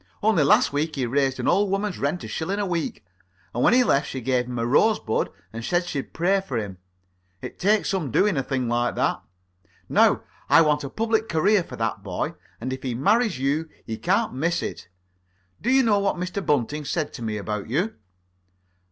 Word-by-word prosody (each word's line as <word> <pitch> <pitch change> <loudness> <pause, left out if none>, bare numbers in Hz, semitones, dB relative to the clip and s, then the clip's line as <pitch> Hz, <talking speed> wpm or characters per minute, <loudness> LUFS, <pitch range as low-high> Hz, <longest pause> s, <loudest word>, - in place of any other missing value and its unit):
Only 215 -6 +4
last 140 0 +4
week 150 +2 -1
he 135 -3 -1
raised 135 +2 0
an - - -2
old 200 +2 +3
woman's 195 0 -1
rent 155 +5 -1
a - - -6
shilling 185 +5 -3
a 205 - 0
week, 170 - -3 0.5
and 120 - -1
when - - +5
he 255 - +6
left 140 - +2
she 130 - -4
gave 125 0 0
him 125 -1 -5
a 115 - 0
rosebud 145 - +2 0.2
and 115 +1 -6
said 175 +7 +1
she'd 145 -6 -4
pray 190 +4 +1
for 135 -10 -4
him. 100 -4 -5 0.6
It - - -8
takes 210 +3 +2
some 185 -8 -1
doing 200 - +2
a 135 - +1
thing 130 -1 -2
like 120 +1 0
that. - - 0 0.7
Now, - - +3 0.3
I 165 - +7
want 150 -2 +1
a 140 - -4
public 220 +4 0
career 185 +5 +3
for - - -9
that 115 -2 -2
boy, 95 -3 -3 0.3
and 130 +3 -3
if 130 - -6
he 125 -3 -3
marries 210 - +2
you 145 +5 -1 0.2
he 110 - -4
can't 200 - 0
miss 165 +7 0
it. 90 - -6 0.7
Do 240 - -1
you 265 +1 +5
know 210 -4 +3
what 200 0 +1
Mr. 180 +2 -4
Bunting 145 +1 0
said 155 +1 -2
to - - -8
me 110 -2 -2
about 105 0 -4
you? 175 - 0
150 Hz, 205 wpm, -24 LUFS, 125-195 Hz, 0.7 s, I